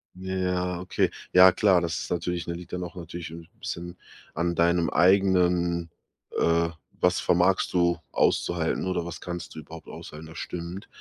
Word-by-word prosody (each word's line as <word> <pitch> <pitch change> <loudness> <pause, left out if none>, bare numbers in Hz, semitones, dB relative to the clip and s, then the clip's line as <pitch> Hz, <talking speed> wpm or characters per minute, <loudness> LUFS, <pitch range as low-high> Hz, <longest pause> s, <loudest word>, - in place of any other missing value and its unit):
Ja, 95 0 -5
ja, 90 -1 -1
okay. 90 - 0 0.2
Ja 90 0 +8
klar, 95 -4 +4
das 85 -1 -2
ist - - -6
natürlich 90 -1 -2
ne, 85 - -3
liegt 85 0 -10
dann 90 - -3
auch 90 +1 -7
natürlich 85 -1 -7
'n 85 0 -10
bisschen 85 +1 -5 0.4
an 85 +1 0
deinem 85 0 +3
eigenen, 90 -2 +3 0.5
äh 85 0 +2 0.3
was - - +4
vermagst - - +2
du 85 -2 +2
auszuhalten 85 +1 +1
oder 90 -2 -1
was 85 - -7
kannst 90 -1 -6
du 80 - -7
überhaupt 80 +2 -12
aushalten, 75 +2 -9
das 80 +1 -12
stimmt. 90 +3 -6
85 Hz, 170 wpm, -26 LUFS, 85-90 Hz, 0.5 s, Ja